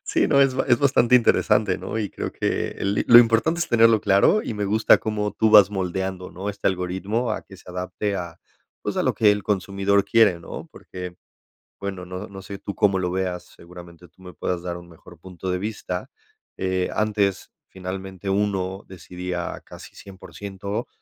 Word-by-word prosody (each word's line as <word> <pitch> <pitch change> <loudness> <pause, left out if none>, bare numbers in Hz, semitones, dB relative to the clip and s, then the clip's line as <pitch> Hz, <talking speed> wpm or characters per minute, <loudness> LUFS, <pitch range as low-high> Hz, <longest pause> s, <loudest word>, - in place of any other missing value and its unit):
Sí, - - +1
no, 140 - +4
es 135 -2 +4
es 120 - +5
bastante 125 -3 +3
interesante, 105 -4 +3
¿no? 110 - -4
Y 105 -3 -2
creo - - -5
que - - -1
el 100 +1 -1
li - - 0
lo 120 - +10
importante 120 +8 +3
es 165 - -1
tenerlo 115 -2 +5
claro 100 - +4
y 110 - -4
me 105 - -2
gusta 110 +2 +4
como 105 -2 -2
tú 110 +1 +2
vas 105 -2 +8
moldeando, 95 -1 -3
¿no? 95 +3 -6
Este 100 0 -5
algoritmo 95 +6 -2
a - - -4
que 95 - -14
se 90 - -13
adapte 90 +3 -3
a, 85 -2 -6 0.5
pues, - - -3
a - - +1
lo - - +1
que 105 -2 +4
el 105 -1 -3
consumidor 100 0 +1
quiere, 105 -4 +4
¿no? 85 - -8
Porque, 90 -1 -9 0.6
bueno, 95 -2 -5
no 90 +3 -7
no 95 -1 -10
sé 100 +1 -8
tú 100 - -6
cómo 95 -2 +2
lo 90 -1 -1
veas, 90 -1 -2
seguramente 85 0 -13
tú 95 - -25
me 90 -2 -11
puedas 85 +3 -3
dar 90 -1 -4
un 85 0 -13
mejor 85 +1 -16
punto 95 +1 -7
de 90 - 0
vista. 105 +2 -5 0.5
Eh, 95 -1 -1
antes, 105 -2 0 0.2
finalmente, 95 +1 -6
uno 95 -1 -1
decidía 90 -1 -6
casi - - -13
100%, 100 +2 -7
95 Hz, 190 wpm, -23 LUFS, 90-105 Hz, 0.6 s, lo